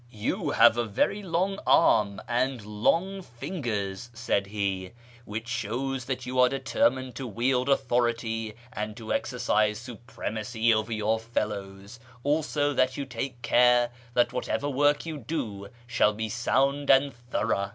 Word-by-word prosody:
" - - -27 0.2
You - - 0
have 120 - +5
a 120 - 0 0.3
loug 190 +1 -1
arm 100 -10 +4
and 125 -1 0
long 165 - 0
fingers," 120 - -4
said 105 -4 0
he, 100 -2 -3 0.2
" - - -22
which 110 +2 -5
shows 120 +3 -2
that 130 -1 -3
you 130 +1 -2
are 125 0 +6
determined 130 -1 0
to 135 - -4
wield 125 +4 0
authority 120 -4 0 0.2
and 105 +1 -4
to 110 -2 -4
exercise 110 -3 +1
supremacy 115 -1 -2
over 110 +1 -1
your 110 0 +1
fellows, 105 -2 -4 0.2
also 145 0 +1
that 130 -1 +1
you 140 - -3
take 125 0 -5
care 120 0 +4 0.2
that 120 0 +3
whatever 145 - -2
work 145 +2 +2
you 160 -3 -5
do 110 -7 -4 0.2
shall 115 -3 +2
be 110 +1 -3
sound 135 +5 +1
and 135 +1 +5
thorough." 120 -4 -2
120 Hz, 145 wpm, -27 LUFS, 110-135 Hz, 0.3 s, are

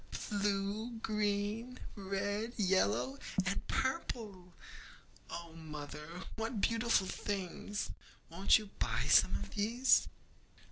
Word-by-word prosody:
blue, 205 +3 0
green, 210 +3 0 0.2
red, 205 +3 -2
yellow, 135 - +2 0.3
and 195 +2 -1
purple! 215 -8 -2 0.8
Oh, 170 -1 -6
mother, 150 +2 -7
what 225 0 -2
beautiful 230 -1 +3
things! 200 +1 -3 0.4
Won't 190 +4 +5
you 210 -2 -7
buy - - +1
some - - +6
of - - -4
these?' 230 +5 +4
205 Hz, 95 wpm, -35 LUFS, 180-220 Hz, 0.8 s, some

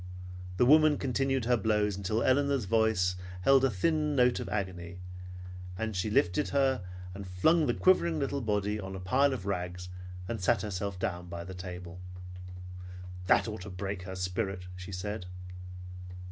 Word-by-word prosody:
The 125 - +5
woman 155 +2 +6
continued 135 -1 0
her 125 +1 +4
blows 105 -2 +1
until 105 +4 0
Elinor's 140 -2 +3
voice 110 -4 +2 0.3
held 135 +6 +5
a 135 - +5
thin 150 - +1
note 125 -2 +4
of - - -4
agony, 95 -3 -3 0.8
and 110 0 -2
she 90 +4 0
lifted 105 +6 +2
her 135 -6 +2 0.3
and 100 0 -7
flung 155 - +3
the - - +1
quivering 170 -3 +4
little 140 -1 -1
body 105 -1 0
on 95 -1 -5
a - - -5
pile 130 +10 +3
of 125 -8 -4
rags, 90 -2 -3 0.4
and 115 -1 -3
sat 100 +1 +2
herself 100 -1 -3
down 90 -1 -3
by 85 -1 -5
the 95 +2 -8
table. 90 -1 -7 1.3
"That - - +5
ought 110 -3 -5
to 95 - -7
break 95 +1 -4
her 95 0 -6
spirit," 90 0 -2
she 90 +1 -8
said. 95 +1 -4
105 Hz, 160 wpm, -31 LUFS, 90-130 Hz, 1.3 s, woman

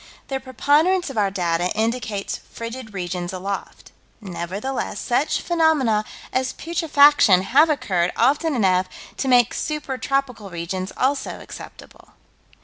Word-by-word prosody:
The 270 -1 -2
preponderance 290 +7 +2
of 250 - -9
our 200 -1 +2
data 175 -2 0
indicates 220 -2 -2
frigid 230 0 -7
regions 180 -2 -4
aloft. 195 +2 -6 0.3
Nevertheless 200 +4 -4
such 275 +5 0
phenomena 300 -11 +2 0.3
as 260 0 0
putrefaction 290 - +4
have 280 +10 +4
occurred 195 - 0
often 290 +5 +2
enough 185 -5 +2 0.3
to 270 - -2
make 245 -3 +4
super 295 -4 -3
tropical 265 -7 -2
regions, 185 +2 -4
also, 270 +2 -1
acceptable. - - -12
240 Hz, 120 wpm, -22 LUFS, 190-280 Hz, 0.3 s, putrefaction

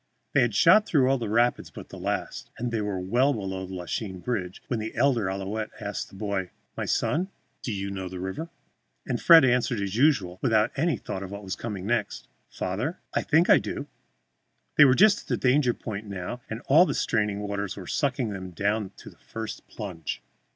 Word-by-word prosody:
They 135 - +5
had 120 -4 +1
shot 205 - +6
through 135 -6 +3
all 135 0 +2
the 115 -3 -3
rapids 120 +3 +2
but - - -11
the - - -9
last, - - -3
and 120 0 -3
were 105 -4 -1
well 120 +10 +2
below 95 -3 -4
the 95 - -7
Lachine 95 +2 -4
bridge 95 -4 -4
when 120 - -2
the 110 +1 -5
elder 125 -8 +2
Ouillette 100 +3 -3
asked - - -4
the - - -15
boy, 100 -2 -2 0.3
"My - - -3
son, 180 +5 0 0.3
do 120 - -3
you 100 -1 -3
know 95 -1 -5
the 90 - -7
river?" 95 - -4 0.6
And - - -2
Fred 165 -5 +8
answered 125 -2 +2
as 100 0 -3
usual, 110 - +2
without 110 -2 +3
any 155 -1 +1
thought 95 - -5
of 95 - -6
what 100 +1 -7
was 95 0 -4
coming 100 -5 -5
next, 120 +3 -1 0.2
"Father, 115 - -3 0.2
I - - +1
think 160 +3 +3
I - - +7
do." - - -5 0.9
They 150 - +9
were 130 -2 +5
just 205 +4 +5
at - - -20
the - - 0
danger 125 -1 +3
point 105 -1 -6
now, 100 +5 -5
and 110 +2 -5
all 165 +7 +5
the - - -1
straining 105 -3 0
waters 100 -1 -3
were 95 - -7
sucking 130 - 0
them 95 -2 -6
down 100 +3 -1
to - - -11
the - - -23
first 110 -1 -7
plunge. 90 -8 -6
110 Hz, 205 wpm, -26 LUFS, 95-130 Hz, 0.9 s, They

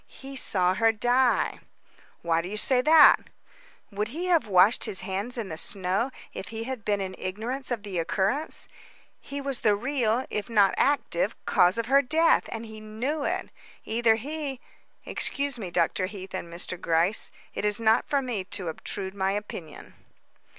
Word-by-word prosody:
"He 270 +1 -11
saw 185 -8 +3
her 225 +3 +3
die." 245 +3 +2 0.6
"Why 165 -1 +2
do 175 - -7
you 210 - -4
say 250 +3 +3
that?" 305 +2 +8 0.7
"Would 205 +1 -2
he 320 +10 -5
have 340 -9 +2
washed 195 +3 +4
his 190 - -2
hands 200 +6 -3
in 220 -5 -4
the 160 - -5
snow 195 +5 0 0.2
if - - -6
he 225 0 -5
had 255 -2 -5
been 205 -1 0
in 190 -1 -4
ignorance 230 +8 -3
of 235 -5 -2
the 195 -4 -3
occurrence? 200 - -1 0.5
He 280 +1 -7
was 275 -2 -3
the 210 -2 +3
real, 245 0 0
if 210 +2 -3
not 205 -4 +4
active, 290 - +1
cause 180 +4 +4
of 230 - -1
her 275 +4 +5
death 320 +5 +3
and 230 0 -5
he 220 -1 -10
knew 235 +8 -3
it. 370 +2 -2 0.4
Either 225 0 +3
he 280 +2 -5 0.5
Excuse 280 -3 -3
me, 190 -5 -5
Dr. 185 +2 +1
Heath 190 -1 -9
and 175 -2 -5
Mr. 175 +1 -5
Gryce, 170 +5 +1 0.2
it - - -4
is 210 0 +2
not 225 +1 +3
for 280 -1 +1
me 235 -7 -3
to 185 -3 -4
obtrude 190 +4 -5
my 195 -1 0
opinion." 200 -6 -7
220 Hz, 175 wpm, -27 LUFS, 190-260 Hz, 0.7 s, that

